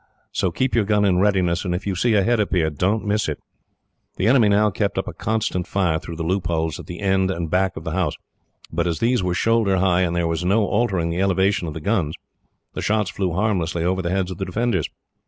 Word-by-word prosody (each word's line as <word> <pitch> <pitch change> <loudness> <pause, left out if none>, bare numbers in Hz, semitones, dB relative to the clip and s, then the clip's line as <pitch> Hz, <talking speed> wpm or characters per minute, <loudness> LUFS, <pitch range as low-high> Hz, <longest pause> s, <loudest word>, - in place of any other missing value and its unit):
So 95 - 0
keep 130 +9 -1
your 115 - +3
gun 105 0 +2
in 90 -2 +3
readiness, 95 -4 +2
and 90 -3 -1
if 90 - -5
you 100 - -1
see 110 +5 +1
a 100 - +4
head 120 +2 +2
appear, 90 -6 +1
don't 95 +9 0
miss 105 -3 0
it." 75 - -3 0.8
The - - 0
enemy 115 -2 +5
now 105 +1 +3
kept - - -2
up - - -1
a - - -5
constant 110 -5 -2
fire 90 -5 +1
through 85 - -8
the 80 - -4
loopholes 85 -3 -1
at - - -10
the 90 +1 -7
end 95 -1 +2
and 85 -4 -3
back 95 +1 +1
of 80 - -6
the 80 - -4
house; 90 -3 0 0.6
but - - 0
as 85 - -1
these 120 0 +1
were 90 -1 -1
shoulder 110 -2 +2
high, 90 -1 +2
and 85 -2 0
there 85 -1 +1
was 85 +1 -2
no 100 +4 +2
altering 95 -8 0
the 85 +2 -1
elevation 95 -1 +1
of 75 - -6
the - - -4
guns, 85 -5 0 0.6
the - - -4
shots 105 -2 0
flew 95 -4 -2
harmlessly 90 -4 0
over 95 +1 +1
the 85 - -2
heads 95 0 -1
of 95 - -7
the 95 - -2
defenders. 95 -2 -1
95 Hz, 240 wpm, -22 LUFS, 85-105 Hz, 0.8 s, enemy